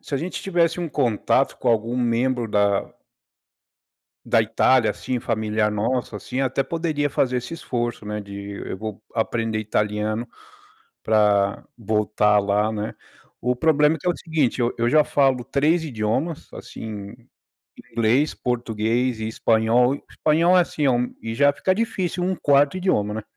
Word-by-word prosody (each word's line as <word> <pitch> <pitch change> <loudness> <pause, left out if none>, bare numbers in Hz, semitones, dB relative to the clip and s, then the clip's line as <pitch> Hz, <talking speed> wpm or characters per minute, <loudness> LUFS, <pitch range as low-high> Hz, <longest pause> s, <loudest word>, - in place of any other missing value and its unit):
se 145 - -6
a - - 0
gente 175 +5 -5
tivesse 175 -3 +1
um 170 - -3
contato 130 -1 +1
com 125 - -2
algum 115 +1 +1
membro 120 0 0
da 100 -1 +1 1.3
da 115 - +3
Itália, 115 +2 +3
assim, 125 -1 -4
familiar 110 -2 0
nossa, 115 +3 -2
assim, 125 +5 -5
até 135 0 0
poderia 155 -1 -1
fazer 130 -1 0
esse 125 +6 -5
esforço, 120 -8 -3
né, 105 0 -4
de 100 0 -8
go 110 +2 -5
vou 105 - -25
aprender 115 -1 -1
italiano 105 +1 -1 0.8
pra 105 -2 +2
voltar 105 -1 +2
lá, 105 +1 +1
né. 105 0 -4 0.5
O 125 +1 0
problema 150 +2 +3
é - - -12
que - - -11
é - - +4
o 175 - -3
seguinte, 155 -7 -1
eu 120 0 +2
eu 120 0 0
já 155 +2 +6
falo 135 -4 +2
3 150 +6 +1
idiomas, 135 +4 -3
assim, 105 -2 -8 0.8
inglês, 120 +7 +2
português 120 0 -1
e 110 - -2
espanhol. 115 +3 +2
O - - -10
espanhol 170 +4 +3
é 180 - +6
assim, 150 -3 -3
é - - +4
um 125 0 0
e 115 0 -4
já 145 +3 +4
fica 185 +6 0
difícil 185 -5 -2
um 185 +1 -1
4º 145 +3 +3
idioma, 105 - 0
né. 110 - -4
120 Hz, 160 wpm, -23 LUFS, 110-145 Hz, 1.3 s, já